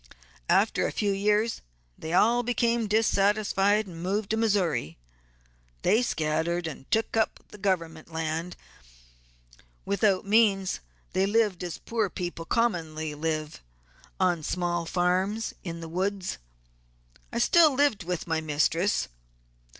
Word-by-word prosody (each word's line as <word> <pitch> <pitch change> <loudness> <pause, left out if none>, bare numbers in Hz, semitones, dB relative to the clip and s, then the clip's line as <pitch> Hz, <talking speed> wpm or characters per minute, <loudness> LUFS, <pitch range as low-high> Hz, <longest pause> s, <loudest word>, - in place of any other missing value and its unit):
After - - +3
a - - -3
few 205 -1 0
years 210 +3 +1 0.3
they 160 - -7
all 230 +7 +4
became 235 -1 +1
dissatisfied, 205 -1 +2
and 170 -3 -9
moved 200 +3 -1
to - - +2
Missouri. 200 - 0 0.9
They 225 - +4
scattered, 170 -4 -1
and 150 -4 -7
took 225 +1 0
up 220 -1 +1 0.2
government 165 -5 -2
land. 160 +2 -3 1.3
Without 200 -1 +1
means 200 -3 +3 0.3
they 190 +2 +2
lived 205 -4 +1
as 175 -2 -4
poor 225 -4 -1
people 175 -1 -5
commonly 160 -9 -1
live, 155 0 -3 0.6
on 180 -3 +2
small 175 +1 -2
farms 185 +5 0
in 170 -2 -6
the 165 - -6
woods. 185 - -2 0.9
I - - -3
still 310 +4 +5
lived 280 -8 +2
with 175 0 -3
my 160 -1 -1
mistress. 160 +5 +1
190 Hz, 120 wpm, -27 LUFS, 165-215 Hz, 1.3 s, still